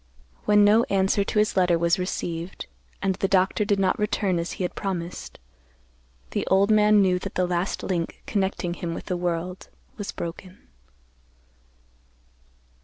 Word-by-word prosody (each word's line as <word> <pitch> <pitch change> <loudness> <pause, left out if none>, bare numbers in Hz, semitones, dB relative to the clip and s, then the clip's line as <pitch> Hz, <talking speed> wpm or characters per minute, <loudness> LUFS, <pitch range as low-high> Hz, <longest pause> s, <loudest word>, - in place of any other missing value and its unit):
When 210 0 +5
no 215 +2 +6
answer 195 +1 +2
to 205 - -3
his 210 0 +2
letter 180 -2 +3
was 170 +3 +2
received, 175 -1 -4 0.4
and 195 -1 +2
the 195 - -1
doctor 190 +2 +2
did 205 -1 +1
not 190 +1 +1
return 205 -3 0
as 170 - -3
he - - -4
had 180 - -2
promised, 180 -3 -5 0.9
the - - -1
old 195 +2 +3
man 210 -1 +5
knew 180 -1 +2
that - - -7
the 180 - +2
last 180 +2 -2
link 170 -3 -3
connecting 190 -4 -1
him 170 -1 -4
with - - -7
the 180 - -2
world 175 +1 -3 0.3
was 205 -2 -4
broken. 180 +3 -7
185 Hz, 155 wpm, -25 LUFS, 175-200 Hz, 0.9 s, no